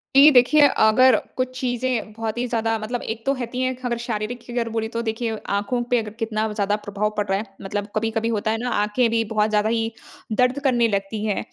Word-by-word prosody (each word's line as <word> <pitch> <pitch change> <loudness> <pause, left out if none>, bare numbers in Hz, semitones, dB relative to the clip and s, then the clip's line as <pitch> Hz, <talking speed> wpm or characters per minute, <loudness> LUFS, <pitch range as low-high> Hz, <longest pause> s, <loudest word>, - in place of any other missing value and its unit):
जी, 285 +3 +9
देखिए, 270 +3 +5
अगर 255 +1 +5 0.2
कुछ 255 0 0
चीज़ें 245 -2 -1
बहुत 225 +1 -4
ही 245 - 0
ज़्यादा 225 -1 0
मतलब 235 +3 -4
एक 225 0 -6
तो 275 - +2
रहती 250 -1 -4
हैं 255 0 0
अगर 235 -1 -1
शारीरिक 235 0 -4
की 240 - -10
अगर 235 -1 -1
बोले 225 0 -2
तो 230 - 0
देखिए 225 0 -2
आँखों 205 +5 0
पे 245 - +4
अगर 215 -1 -5
कितना 220 -1 -1
ज़्यादा 205 -1 0
प्रभाव 210 0 -2
पड़ 210 - +1
रहा 195 0 +1
है। 215 - -4 0.2
मतलब 205 +1 -3
कभी-कभी 225 +1 0
होता 220 -1 0
है 225 - 0
ना, 250 - -1
आँखें 215 +3 +1
भी 225 0 +1
बहुत 215 0 +1
ज़्यादा 210 0 +2
ही 225 0 0 0.4
दर्द 250 +5 +2
करने 240 -4 +3
लगती 200 +1 -2
है। 210 -2 0
225 Hz, 225 wpm, -22 LUFS, 215-245 Hz, 0.4 s, जी